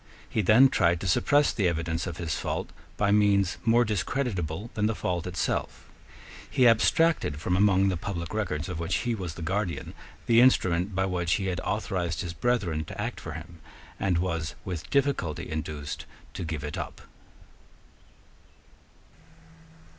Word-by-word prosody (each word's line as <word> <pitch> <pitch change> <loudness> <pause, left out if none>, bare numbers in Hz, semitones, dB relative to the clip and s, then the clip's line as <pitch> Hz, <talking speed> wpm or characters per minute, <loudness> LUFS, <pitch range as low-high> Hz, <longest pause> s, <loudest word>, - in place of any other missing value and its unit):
He 110 - 0
then 110 +7 +7
tried 85 -6 +2
to 100 - -3
suppress 145 +11 +3
the 100 -6 +1
evidence 85 +1 -1
of 85 -1 -5
his 85 -3 -2
fault - - -3 0.3
by 100 -1 +2
means 100 -3 +3
more 120 +1 +4
discreditable 105 - -2
than 105 0 +1
the 110 - -1
fault 90 -2 -2
itself. 90 -2 -2 0.6
He 125 - +4
abstracted 115 - +3
from 90 +3 0
among 100 0 +4
the 90 - -1
public 85 -1 -5
records 85 -8 -2
of 90 -3 -4
which 85 +2 -1
he 120 - +1
was 90 -7 -5
the 85 - -7
guardian 95 0 -2 0.3
the 115 0 +5
instrument 95 -6 +3
by 95 +1 +1
which 90 -3 0
he 100 - 0
had 90 - -4
authorised 85 -2 -2
his 85 -2 -4
brethren 90 -7 0
to - - -9
act - - -3
for - - -7
him, 80 +1 -9 0.4
and 95 -3 +1
was 85 -3 -2
with 85 -5 -5
difficulty 135 - 0
induced 75 -1 -5 0.3
to 95 - -5
give 80 -2 -4
it 75 0 -4
up. - - -6
90 Hz, 160 wpm, -27 LUFS, 85-105 Hz, 0.6 s, then